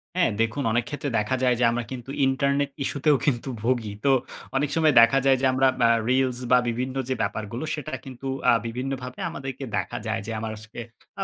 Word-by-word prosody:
হ্যাঁ, 175 -10 +3
দেখুন 115 +5 0
অনেক 120 +2 +2
ক্ষেত্রে 145 -1 -3
দেখা 105 +5 0
যায় 125 -1 +4
যে, - - +2
আমরা 120 +1 -1
কিন্তু 130 0 -7 0.2
ইন্টারনেট 140 +1 +1
ইসূতেও 145 +2 +2
কিন্তু 135 -2 0
ভোগী 115 -4 0
তো 140 - +5 0.4
অনেক 145 +2 +1
সময় 155 -3 +4
দেখা 115 +4 +5
যায় 135 -1 +5
যে 135 - +2
আমরা 135 +1 +4 0.2
আ 115 - +5 0.2
reels 130 -1 +2
বা 125 - +8
বিভিন্ন 125 +3 -3
যে - - +2
ব্যাপারগুলো 110 +4 -3
সেটা 155 0 -6
কিন্তু 135 0 -8 0.2
আ - - +5
বিভিন্নভাবে 125 +1 -5
আমাদেরকে 135 -1 -6
দেখা - - -3
যায় 110 +1 -1
যে, 115 - -5
আমার 110 0 -4
আজকে 110 +2 -11 0.4
আ - - +1
130 Hz, 200 wpm, -25 LUFS, 120-135 Hz, 0.4 s, বা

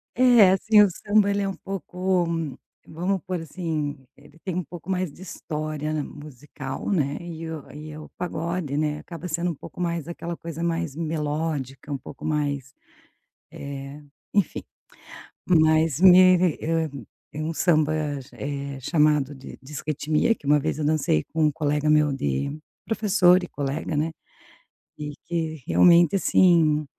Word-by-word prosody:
É, 240 -6 +7
assim 210 +3 +4
o - - +5
samba 205 +2 +2
ele 200 0 0
é 195 - 0
um 195 - -5
pouco, 185 -1 -1 0.6
vamos 180 +4 -2
pôr 180 -2 -3
assim, 155 -3 -3 0.2
ele 145 +2 -19
tem 185 - -2
um 180 +1 -1
pouco 170 +3 -11
mais 185 -3 -1
de 180 - -13
história 155 -3 -4
na 155 -1 -1
musical, 145 -2 -8
né, 145 -6 0
e 165 -1 -7
o 160 -3 -7
e 150 +1 -9
o 155 - -9
pagode, 170 -4 -3
né, 150 0 0
acaba 170 +2 -8
sendo 170 +1 -1
um 170 - -3
pouco 160 - -10
mais 170 -2 -2
aquela 170 0 -5
coisa 165 -1 -7
mais 165 -3 -1
melódica, 150 -3 -3
um 140 - -1
pouco 135 - -12
mais, 145 -3 -2 0.8
eh, 140 -1 -7 0.4
enfim. 200 -4 0 0.8
Mas 160 -3 +3
me 185 0 +8 0.2
eh, 165 0 0 0.5
um 155 +2 -3
samba, 155 -2 +2 0.4
eh, 140 -1 -5
chamado 150 -1 +2
de 135 -1 -11
disquetimia, 150 - -1
que - - -15
um 145 +1 +5
vez 140 - -2
eu 155 - -1
dancei 150 - +1
com 160 -1 +2
um - - +3
colega 150 0 0
meu 150 -1 +4
de 70 - -2 0.3
professor 195 -5 +4
e 180 - -6
colega, 145 +2 -3
né, 155 +2 0 0.9
e 150 -1 -5
que 160 -4 -3
realmente 175 +1 +5
assim, 165 -5 +4
155 Hz, 150 wpm, -24 LUFS, 150-175 Hz, 0.9 s, me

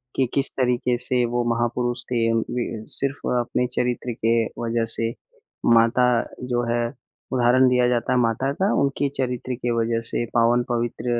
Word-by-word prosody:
कि 130 - +2
किस 140 0 +3
तरीके 125 -1 +1
से 125 0 0
वो 120 +1 -1
महापुरुष 120 +1 -1
थे। 115 -2 +1
अ, 115 - +2
वि 115 -1 -3
सिर्फ़ 140 +1 -1 0.2
अपने 125 +1 -1
चरित्र 125 0 -1
के 115 0 +3 0.2
वज़ह 115 0 0
से 115 0 -1 0.6
माता 115 +2 +4 0.4
जो 120 - +1
है 120 - +1 0.5
उदाहरण 125 +1 +4
दिया 125 -1 +3
जाता 120 0 0
है 125 - +3
माता 120 +4 +1
का 195 - +3
उनके 140 0 0
चरित्र 125 0 -2
की 120 - 0
वजह 115 0 0
से 120 - -2
पावन 120 +1 +3
पवित्र 120 0 -2
120 Hz, 165 wpm, -23 LUFS, 115-125 Hz, 0.6 s, माता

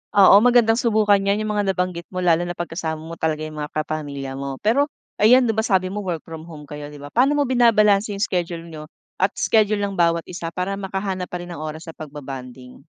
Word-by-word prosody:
Oo, 200 +2 +8
magandang 240 -2 +5
subukan 215 -3 +3
'yan 200 +1 +1
yung 215 -1 -2
mga 200 -2 +1
nabanggit 180 -2 -2
mo 185 - -4
lalo 175 -1 +3
na 175 - -4
pag 175 0 -4
kasama 160 -2 -4
mo 165 +1 -8
talaga 155 -1 -2
yung 155 -1 -6
mga 150 - -7
kapamilya 145 -3 -4
mo. 135 -1 -5
Pero 280 +8 +2 0.2
ayan, 245 +4 +5
di 225 - 0
ba 220 - +1
sabi 190 -4 +2
mo 205 +2 -4
work 175 -4 -2
from 160 -1 -8
home 155 -3 -11
kayo, 150 0 -8
di 145 - -11
ba, 145 - -9
paano 255 - +3
mo 285 - +2
binabalanse 215 -4 +4
yung 200 - -5
schedule 170 -4 -2
niyo 155 -1 -10 0.2
at 190 - +1
schedule 215 -1 +3
ng 200 -1 -2
bawat 170 -1 +1
isa 170 -2 -6
para 185 +3 -2
makahanap 190 -1 -4
pa 180 - -4
rin 175 - -8
ng 155 - -7
oras 155 +2 -7
sa 165 - -8
pagba-bonding? 130 -4 -9
180 Hz, 230 wpm, -22 LUFS, 155-205 Hz, 0.2 s, Oo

